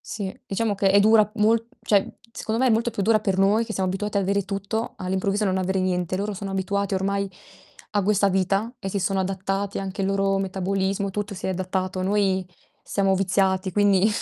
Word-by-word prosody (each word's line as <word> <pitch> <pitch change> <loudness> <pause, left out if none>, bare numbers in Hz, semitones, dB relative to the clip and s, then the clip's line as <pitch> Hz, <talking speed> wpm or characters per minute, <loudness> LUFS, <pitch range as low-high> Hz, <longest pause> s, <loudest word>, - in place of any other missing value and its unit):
Sì, 200 -3 -5
diciamo 205 +1 0
che 195 0 +3
è 200 +1 +6
dura 215 0 +5
mol 225 +2 +3 0.2
cioè, 200 -2 +3 0.3
secondo 225 +2 -3
me 260 - +4
è - - +3
molto 230 +2 +1
più 200 - -3
dura 215 +1 +4
per 195 -3 -1
noi, 205 +4 +3
che 220 - -6
siamo 190 -2 -1
abituati 205 +2 -3
ad 200 - +3
avere 200 +1 0
tutto, 200 +4 -3
all'improvviso 190 +3 -1
non 190 -1 +1
avere 190 +1 0
niente. 180 -1 -1
Loro 205 +2 -2
sono 195 0 -5
abituati 195 +1 -1
ormai 200 +1 0 0.6
a 205 -1 +2
questa 200 0 +3
vita 195 +4 0
e 195 - -5
si 195 0 -2
sono 195 +1 0
adattati, 195 +1 -2
anche 195 0 -4
il - - +1
loro 195 0 +1
metabolismo, 195 +1 -1
tutto 205 +1 -4
si - - -5
è 190 - 0
adattato. 185 0 -2
Noi 190 -1 +1 0.4
siamo 195 -1 +1
viziati 190 0 +1
quindi 205 0 +4
195 Hz, 205 wpm, -24 LUFS, 190-205 Hz, 0.6 s, è